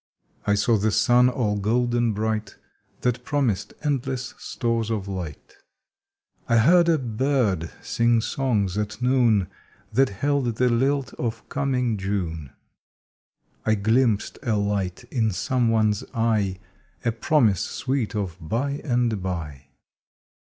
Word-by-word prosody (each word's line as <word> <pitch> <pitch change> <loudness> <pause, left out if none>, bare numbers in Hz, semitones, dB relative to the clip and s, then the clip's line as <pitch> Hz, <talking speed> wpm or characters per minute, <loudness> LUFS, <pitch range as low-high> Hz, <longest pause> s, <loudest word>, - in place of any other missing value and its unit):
I 100 - +4
saw 110 +3 +3
the 105 +2 +1
sun 120 +4 +4
all 110 -5 0
golden 120 +2 +1
bright 110 0 -2 0.5
That 125 0 0
promised 115 -8 -1
endless 130 -3 -2
stores 115 -2 -2
of 105 -4 -2
light. 90 -7 -7 0.9
I 115 - +4
heard 170 +8 +5
a 165 - +4
bird 120 - 0
sing 115 0 +2
songs 110 -5 0
at 105 0 -3
noon 120 -6 +3 0.5
That 135 0 +4
held 125 +3 0
the 125 +2 +2
lilt 135 +3 +1
of 115 -2 -3
coining 125 -5 0
June. 85 -8 -3 1.1
I 110 - +2
glimpsed 110 +1 +1
a 115 -3 0
light 100 -1 -1
in 115 -4 +1
some 120 +4 0
one 110 -1 +3
s 105 - -4
eye, 110 -5 +1 0.5
A 115 - +3
promise 115 - +2
sweet 130 -5 -2
of 95 -5 -3
"by 125 - -2
and 120 -6 0
by." 75 -7 -5
115 Hz, 130 wpm, -24 LUFS, 100-125 Hz, 1.1 s, heard